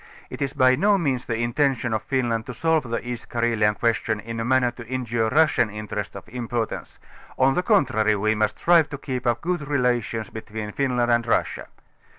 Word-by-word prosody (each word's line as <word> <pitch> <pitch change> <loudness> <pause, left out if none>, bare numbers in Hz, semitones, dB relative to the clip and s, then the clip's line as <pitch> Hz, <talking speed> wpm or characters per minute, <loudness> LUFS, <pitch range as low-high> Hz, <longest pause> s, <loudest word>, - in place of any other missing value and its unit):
It - - -7
is 135 0 -1
by 130 -2 +4
no 200 +6 +3
means 135 -8 -1
the 115 - -2
intention 120 0 0
of 110 - 0
Finland 120 -4 -1
to 125 - -6
solve 160 -1 +1
the 115 +1 -3
East 120 -1 -6
Carelian 115 -3 +1
question 115 -1 0
in 115 +2 -6
a - - -1
manner 125 0 +2
to 120 -1 -11
injure 120 -3 -1
Russian 155 -5 +3
interests 105 -1 -5
of - - -9
importance, 120 -1 -4 0.4
on 135 +1 +4
the 180 - +1
contrary, 130 - +2
we 110 +2 +1
must 110 0 0
strive 165 -3 +4
to 145 - -5
keep 130 -3 -4
up 120 -1 +1
good 175 -4 -2
relations 120 -6 0
between 110 -1 -6
Finland 125 -1 0
and 120 0 +2
Russia. 115 - 0
120 Hz, 190 wpm, -24 LUFS, 110-135 Hz, 0.4 s, by